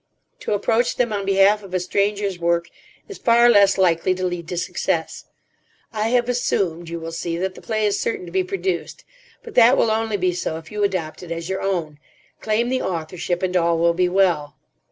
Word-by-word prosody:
To - - -2
approach 225 +4 +1
them 235 -3 0
on 200 -1 -3
behalf 195 +2 +4
of 190 -2 -7
a - - +2
stranger's 200 +1 -1
work 170 0 0 0.4
is 405 - -10
far 235 0 +5
less 200 -3 +5
likely 185 0 +2
to 185 0 -3
lead 175 -2 -4
to 180 - -4
success. - - -2 0.7
I 215 0 -1
have 245 0 +2
assumed, 180 -9 -1
you 170 0 -5
will 165 0 -6
see, 165 0 -3
that 185 +2 -2
the - - -13
play 215 -1 -1
is 205 - 0
certain 425 -6 -2
to - - -10
be 380 -1 +1
produced. 380 0 -3 0.4
But 460 -2 -10
that 245 +2 +6
will 225 - +3
only 220 -1 0
be 180 -1 0
so 170 -2 -3
if 160 -1 -12
you 210 -1 -2
adopt 185 -6 -2
it 175 -2 -9
as 165 +1 -4
your 190 0 -2
own. 165 -6 -2 0.4
Claim 220 +2 0
the 260 0 0
authorship, 175 +1 -3
and 185 0 -1
all 170 -1 +2
will 170 +1 +3
be 180 +1 +1
well." 175 -6 +1
190 Hz, 210 wpm, -21 LUFS, 170-220 Hz, 0.7 s, that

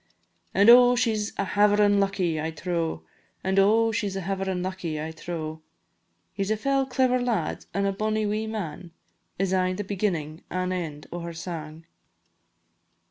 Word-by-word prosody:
An' 200 +2 +5
oh! 245 +1 +8
she 240 -2 +2
's 210 0 -2
a 200 - 0
haverin' 205 0 +4
lucky, 185 -5 0
I 160 - -2
trow, 165 - -3 0.4
An' 190 +1 +2
oh! 225 +3 +4
she 210 -2 -1
's 190 - -7
a 195 - -2
haverin' 190 -1 -2
lucky, 180 -4 -3
I 155 +1 -4
trow; 160 -1 -6 0.7
"He 195 - -2
's 195 - -4
a 220 - +1
fell 275 +3 +1
clever 255 -1 +2
lad, 245 -3 -2
an' 200 0 0
a 200 - +2
bonny 215 +2 0
wee 215 +1 -1
man," 180 -5 -5 0.4
Is 190 0 0
aye 185 0 +2
the 205 +3 -3
beginnin' 175 -6 -2
an' 185 0 -2
end 160 -5 -4
o' 175 - -4
her 170 0 -6
sang. 160 -2 -7
195 Hz, 175 wpm, -26 LUFS, 170-210 Hz, 0.7 s, oh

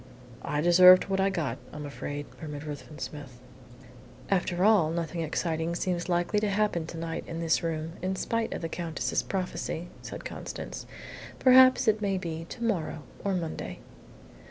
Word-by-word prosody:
"I 150 0 -1
deserved 180 +2 +8
what 195 0 +1
I 195 +1 +3
got, 155 -10 -2
I'm 150 0 -7
afraid," 145 0 -5 0.2
murmured 150 -2 -6
Ruthven 150 0 -8
Smith. 140 -6 -7 0.9
"After 180 -1 +1
all, 205 -8 +5
nothing 165 0 -2
exciting 165 +1 -1
seems 175 0 -2
likely 175 +4 +2
to 210 0 0
happen 200 -5 0
to 165 - -7
night 165 0 -4
in 165 - -5
this 165 -1 +2
room, 160 -1 -2
in 185 +1 -1
spite 230 +4 -1
of - - -4
the - - 0
Countess's 165 -1 -2
prophecy," 180 -2 -3
said - - -8
Constance. - - -6 0.5
"Perhaps 255 -1 +7
it 215 0 +3
may 195 -2 +1
be 165 -2 -4
to 235 - -7
morrow 165 -8 -1 0.2
or 200 -1 0
Monday." 165 -3 -4
170 Hz, 160 wpm, -28 LUFS, 160-195 Hz, 0.9 s, deserved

